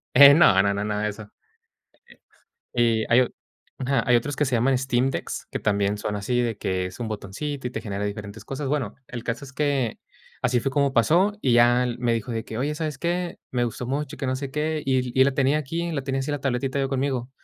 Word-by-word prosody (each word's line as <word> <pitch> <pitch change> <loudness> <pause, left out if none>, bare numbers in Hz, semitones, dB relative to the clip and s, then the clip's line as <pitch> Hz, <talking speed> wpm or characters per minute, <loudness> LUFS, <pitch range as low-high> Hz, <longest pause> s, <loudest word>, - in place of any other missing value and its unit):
Eh, 140 0 +10
no, 105 - +6
no, 100 0 +1
nada 105 +1 -2
de 105 - +1
eso. 105 0 -9 1.4
Eh, 115 -2 +2
y - - 0
hay 125 - +7
o 125 - +2 0.5
ajá, 135 +1 +1
hay 125 - +5
otros 135 +4 0
que 150 - +1
se 125 -2 0
llaman 130 +3 +3
Steam 130 0 +1
Decks, - - -5
que - - -3
también 100 0 +1
son 105 0 -3
así 120 +5 0
de 115 -3 -1
que 95 -2 -1
es 90 - -11
un 120 - -3
botoncito 125 +6 -4
y - - -4
te - - -4
genera 100 -2 -4
diferentes 105 +1 -6
cosas. 135 +1 -4
Bueno, 135 -7 -1
el 120 -2 -7
caso 120 +4 -3
es 140 - -13
que 140 -5 0 0.4
así 125 -1 +2
fue 135 +3 -2
como 140 -1 +2
pasó 180 - +3
y 125 - +2
ya 120 +1 +5
él 120 -1 -2
me 120 -1 +1
dijo 115 +1 -3
de 115 -1 -2
que: 110 - -7
"Oye, 145 +5 -1
¿sabes 155 -3 -3
qué? 175 +2 -2
Me 125 -1 +1
gustó 120 +1 -3
mucho, 140 +2 -3
que - - -3
no 130 0 0
sé 135 0 -5
qué", 155 +2 -1
y 130 -1 +2
l 125 -1 -3
y 130 - +5
la 140 - +3
tenía 140 +2 +2
aquí, 165 +4 -3
la 140 -4 -2
tenía 135 0 -1
así 135 +2 -3
la 145 - -3
tabletita 135 0 -1
yo 135 -1 0
conmigo. 130 -2 -1
125 Hz, 245 wpm, -24 LUFS, 115-140 Hz, 1.4 s, Eh